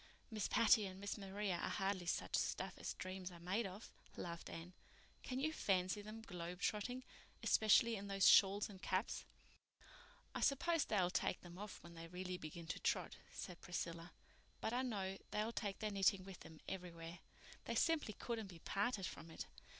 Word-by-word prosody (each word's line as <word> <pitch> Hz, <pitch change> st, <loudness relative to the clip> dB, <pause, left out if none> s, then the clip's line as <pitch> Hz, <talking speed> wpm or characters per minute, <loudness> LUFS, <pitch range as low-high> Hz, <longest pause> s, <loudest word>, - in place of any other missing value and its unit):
"Miss 215 Hz, -2 st, 0 dB
Patty 220 Hz, -2 st, +6 dB
and 190 Hz, 0 st, -8 dB
Miss 200 Hz, +1 st, -2 dB
Maria 195 Hz, -2 st, -1 dB
are -, -, -1 dB
hardly 195 Hz, -2 st, 0 dB
such -, -, +1 dB
stuff -, -, 0 dB
as -, -, -3 dB
dreams 185 Hz, 0 st, -4 dB
are 170 Hz, -, -10 dB
made 190 Hz, +6 st, 0 dB
of," 195 Hz, +4 st, -9 dB, 0.3 s
laughed 170 Hz, -1 st, -4 dB
Anne. 170 Hz, +2 st, -7 dB, 0.5 s
"Can 255 Hz, 0 st, -2 dB
you 310 Hz, +3 st, +1 dB
fancy 185 Hz, -4 st, +2 dB
them 215 Hz, +2 st, -8 dB
'globe 180 Hz, -3 st, -5 dB
trotting'—especially 230 Hz, 0 st, +2 dB
in 200 Hz, -1 st, -5 dB
those 195 Hz, -1 st, +5 dB
shawls 200 Hz, +1 st, +7 dB
and 195 Hz, -3 st, -11 dB
caps?" 190 Hz, +4 st, 0 dB, 1.1 s
"I -, -, -2 dB
suppose 325 Hz, +3 st, +3 dB
they'll 185 Hz, -5 st, +2 dB
take -, -, +1 dB
them 175 Hz, +1 st, -10 dB
off 210 Hz, -1 st, -7 dB
when 170 Hz, -, -10 dB
they 165 Hz, 0 st, -7 dB
really 180 Hz, +1 st, -4 dB
begin 165 Hz, +1 st, -6 dB
to -, -, -2 dB
trot," -, -, 0 dB
said 180 Hz, -2 st, -6 dB
Priscilla, 170 Hz, -1 st, -3 dB, 0.5 s
"but 220 Hz, -, -1 dB
I 250 Hz, -, +2 dB
know 195 Hz, -6 st, -2 dB
they'll 215 Hz, +2 st, 0 dB
take 205 Hz, -4 st, -2 dB
their 215 Hz, -1 st, -1 dB
knitting 195 Hz, -1 st, +4 dB
with 190 Hz, -1 st, -9 dB
them 160 Hz, -1 st, -11 dB
everywhere. 170 Hz, -2 st, -5 dB, 0.5 s
They -, -, -1 dB
simply 320 Hz, -9 st, +3 dB
couldn't 225 Hz, 0 st, -3 dB
be 180 Hz, -3 st, -10 dB
parted 200 Hz, +4 st, 0 dB
from 165 Hz, 0 st, -6 dB
it. 160 Hz, -, -5 dB
195 Hz, 175 wpm, -41 LUFS, 180-215 Hz, 1.1 s, shawls